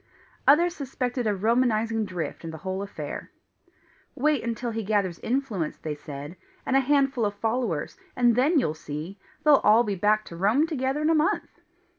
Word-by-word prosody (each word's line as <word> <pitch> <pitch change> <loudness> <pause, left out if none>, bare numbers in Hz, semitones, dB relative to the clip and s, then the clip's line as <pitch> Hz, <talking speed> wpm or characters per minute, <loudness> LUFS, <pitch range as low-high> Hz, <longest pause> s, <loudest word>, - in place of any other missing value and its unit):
Others 340 +5 +5
suspected 250 -3 -3
a 210 - +1
Romanizing 225 +1 +1
drift 180 -4 -5
in 165 - -5
the 160 - -7
whole 190 +1 -2
affair. 200 - -6 0.9
"Wait 295 0 +1
until 235 +1 -3
he 225 0 -3
gathers 195 -4 0
influence," 230 - -2
they 155 - -4
said, 145 +3 -8 0.3
"and 265 - 0
a - - +7
handful 270 -2 +2
of 205 -1 0
followers, 220 -7 -2 0.2
and 240 -2 +4
then 290 +7 +3
you'll 155 - 0
see! 155 +5 -7 0.2
They'll 295 -2 +6
be - - -22
all 220 +3 +6
back 210 +1 +1
to 170 - -9
Rome 210 - +3
together 285 -2 -1
in 315 - +3
a - - +4
month!" 310 0 0
225 Hz, 175 wpm, -26 LUFS, 190-265 Hz, 0.9 s, a